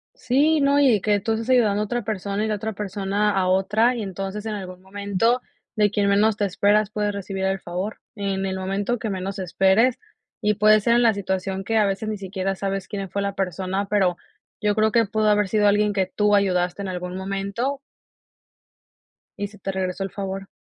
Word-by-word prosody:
Sí, 285 +5 +2
no, 280 +1 +4
y 250 -8 +4
que 205 0 +2
tú 220 +3 -2
estás 225 +3 -3
ayudando 215 -5 +3
a - - 0
otra 240 +2 -2
persona 205 0 -2
y - - -1
la 215 - 0
otra 220 +2 -4
persona 205 +1 -1
a 190 -2 +1
otra, 210 +6 +2
y 230 - -3
entonces, 195 +2 -5
en 220 - -3
algún 185 -3 -7
momento, 200 +5 0 0.3
de 210 -2 +3
quien 205 -1 0
menos 210 +2 +3
te 205 - +1
esperas 205 +2 +2
puedes 210 -1 -1
recibir 195 -1 -4
el 190 0 0
favor. 180 +5 -4 0.2
En 195 -2 -2
el 190 -1 -2
momento 200 +5 -1
que 225 - -3
menos 195 +1 -4
esperes, 190 +7 +3 0.4
y 210 - +2
puede 215 0 +5
ser 235 +2 +3
en 240 - +4
la 225 -2 +5
situación 190 0 -2
que 225 +3 0
a 215 - +4
veces 195 +3 -2
ni 215 - -3
siquiera 195 0 -2
sabes 195 -2 -3
quién 195 -2 -5
fue 200 +2 -2
la 200 0 -2
persona, 190 +1 -2
pero, 190 -4 +2 0.4
yo 210 -1 +1
creo 220 0 +3
que 230 -1 +4
pudo 215 +1 0
haber 210 -1 +3
sido 210 -1 +3
alguien 205 +1 +3
que 190 -1 +1
tú 210 +2 +2
ayudaste 180 -1 +1
en 195 - -4
algún 180 0 -5
momento 200 +8 -2 1.6
y 205 - -2
se 210 +1 -16
te 195 - -3
regresó 190 0 -2
el 195 - -5
favor. 195 -1 -5
200 Hz, 210 wpm, -23 LUFS, 195-215 Hz, 1.6 s, puede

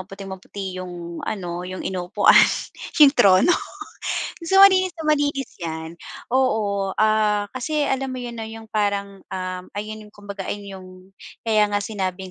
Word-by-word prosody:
maputing-maputi 190 0 -7
yung 175 -2 -7
ano, 175 -4 -4
yung 185 - -6
inuupuan, 180 -1 +3 0.7
yung 285 -2 +9
trono. 200 - +5 0.9
So, 385 +3 +5
malinis 375 -2 +6
na 325 - -7
malinis 285 -3 +1
'yan. 160 -1 -5 0.4
Oo, 210 -7 +1
ah, 215 -1 +2
kasi 295 +4 -2
alam 265 0 -1
mo 255 - -5
'yon 240 -1 -6
'no, 225 - -4
'yong 225 0 -10
parang, 200 -2 -1
um, 185 -1 -4
ayun 215 +1 -6
yung 210 - -19
kumbaga 200 -2 -7
ayon 205 -1 -5
yung 185 - -12 0.5
kaya 215 -2 +3
nga 205 0 -1
sinabing 190 -3 -4
205 Hz, 145 wpm, -22 LUFS, 185-235 Hz, 0.9 s, yung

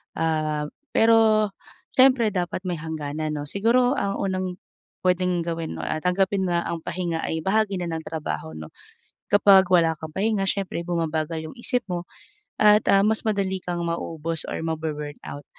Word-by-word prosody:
Ah, 155 -2 0 0.3
pero 220 -2 +5 0.5
siyempre 255 -4 +5
dapat 180 -1 -2
may 175 -3 -2
hangganan 155 -1 -4
'no. 145 - -3
Siguro 245 - +2
ang 200 0 -1
unang 185 -2 -2 0.5
pwedeng 180 -1 +2
gawin 165 -1 -4
'no, - - -5
ah, 155 - -2
tanggapin 190 +1 +1
na 170 -1 +1
ang 170 - -3
pahinga 170 -2 -2
ay 160 - -2
bahagi 205 0 +1
na 175 - -3
ng 160 0 -4
trabaho 80 - -4
'no. 80 -1 -9 0.6
Kapag 195 -2 +6
wala 165 -2 +4
kang 160 -1 -7
pahinga 205 +1 0
siyempre 190 -4 -2
bumabagal 160 -2 -2
'yung - - -11
isip 245 0 0
mo 175 -1 -3 0.6
at 210 0 +6
ah, 195 +1 +5
mas 220 0 +1
madali 195 -3 0
kang 175 -1 -3
mauubos 165 -1 -2
or - - -3
ma-bu-burn 150 -2 -4
out. 145 0 -8
175 Hz, 160 wpm, -24 LUFS, 160-200 Hz, 0.6 s, Kapag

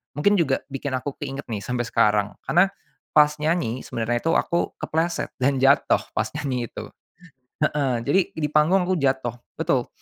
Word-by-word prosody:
mungkin 205 +8 +3
juga 135 -5 +2
bikin 140 0 -5
aku 135 +2 -4
keinget 140 0 -5
nih 105 - -2
sampai 125 +3 -2
sekarang. 105 -2 +2 0.2
Karena 175 +3 +5 0.5
pas 150 -1 +7
nyanyi 150 -6 0
sebenarnya 120 +1 -2
itu 165 - +2
aku 170 - +1
kepleset 165 +2 -1
dan 135 +2 +2
jatuh 135 +2 +4 0.2
pas - - +1
nyanyi 130 -5 -2
itu - - -7 0.8
heeh. 145 -4 +1
Jadi, 170 +7 +4
di 155 -2 -1
panggung 160 +5 +4
aku 185 - +2
jatuh 130 -4 0 0.2
betul. - - +1
140 Hz, 160 wpm, -24 LUFS, 125-155 Hz, 0.8 s, pas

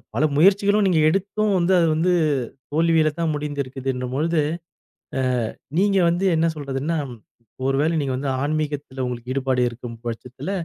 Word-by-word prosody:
பல 145 - +1
முயற்சிகளும் 200 +4 +4
நீங்க 170 -4 +3
எடுத்தும் 200 +4 0
வந்து, 180 +2 +2
அது 165 - +3
வந்து 175 +3 +2 0.6
தோல்வியில்தான் 160 0 +2
முடிஞ்சிருக்குதுன்னு 135 -3 -3
போழுது, 160 +2 +1 0.8
அ - - +1 0.6
நீங்க 195 0 +3
வந்து 175 +3 -1
என்ன 165 - +3
சொல்றதுன்னா, 145 +3 -2 0.7
ஒருவேள 150 +5 +1
நீங்க 135 -3 -1
வந்து 140 +2 -3
ஆன்மீகத்துல 145 -3 -2
உங்களுக்கு 125 0 -5
ஈடுபாடு 130 -1 0
இருக்கும் 120 0 -8
பட்சத்துல, 125 +8 -5
150 Hz, 130 wpm, -22 LUFS, 135-170 Hz, 0.8 s, முயற்சிகளும்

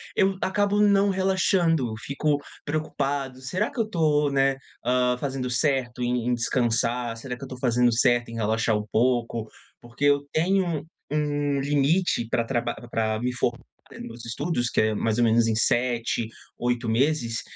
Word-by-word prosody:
eu 195 0 +2
acabo 205 +2 +1
não 200 -1 +4
relaxando. 185 - +1
Fico 145 +4 0 0.3
preocupado. 140 -3 -2
"Será 185 - -1
que 280 - -7
eu 220 -1 0
tô, 150 -6 +2
né, 135 0 +2 0.3
hã, 125 0 +2
fazendo 130 -1 -3
certo 125 -1 0
em 120 -1 -1
em 125 - +2
descansar? 120 -1 0
Será 125 +2 -6
que 135 - -11
eu - - -4
estou 130 -1 -9
fazendo 125 -1 +3
certo 120 0 +2
em 115 - -7
relaxar 110 0 +1
um 105 - -4
pouco?" 115 -1 +1 0.3
Porque 120 +4 -4
eu 145 0 +3
tenho 185 +4 +2
um 155 -4 -3 0.3
um 145 -1 0
limite 145 -1 +1
pra 115 0 +1
traba 120 -1 -1 0.2
pra 110 -1 0
me 125 +2 -1
formar 120 -1 -1 0.4
nos - - -9
meus 115 0 -9
estudos, 120 0 -1
que - - 0
é 110 0 +2
mais 110 +1 0
ou 120 - +3
menos 115 0 +4
em 110 - +1
7, 120 0 +1 0.3
8 120 -1 -1
meses 120 0 +1
125 Hz, 170 wpm, -25 LUFS, 120-150 Hz, 0.4 s, não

